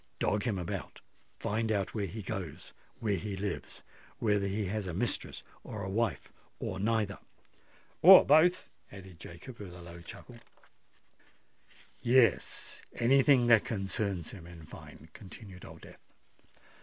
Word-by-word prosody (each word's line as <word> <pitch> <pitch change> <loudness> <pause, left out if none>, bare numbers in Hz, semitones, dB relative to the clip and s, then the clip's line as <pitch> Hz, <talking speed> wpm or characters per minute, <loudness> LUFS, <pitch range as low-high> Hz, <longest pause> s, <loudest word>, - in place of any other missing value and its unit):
Dog 105 0 +1
him 110 -5 0
about—find 105 +4 -5
out 100 -3 -1
where 105 -3 -2
he 105 +4 -7
goes—where 95 +4 -5
he 100 +2 -5
lives—whether 100 +1 -3
he 100 +2 -2
has 100 +1 -3
a 85 - -4
mistress - - -3 0.2
or - - -6
a 95 - -4
wife, 110 -3 -1 0.3
or 95 - -4
neither——" 105 -1 0 0.8
"Or - - +10
both," 165 +5 +4 0.2
added 95 -3 -12
Jacob, 90 +10 -11
with 95 -4 -8
a 90 - -11
low 85 0 -10
chuckle. 120 +7 -11 1.6
"Yes—any 125 +1 +2
thing 130 -3 +5
that 115 -3 +6
concerns 100 -4 -2
him, 85 -4 -11
in 85 -2 -12
fine," 80 - -13
continued 95 -2 -12
Old - - -12
Death. - - -14
100 Hz, 130 wpm, -31 LUFS, 95-115 Hz, 1.6 s, Or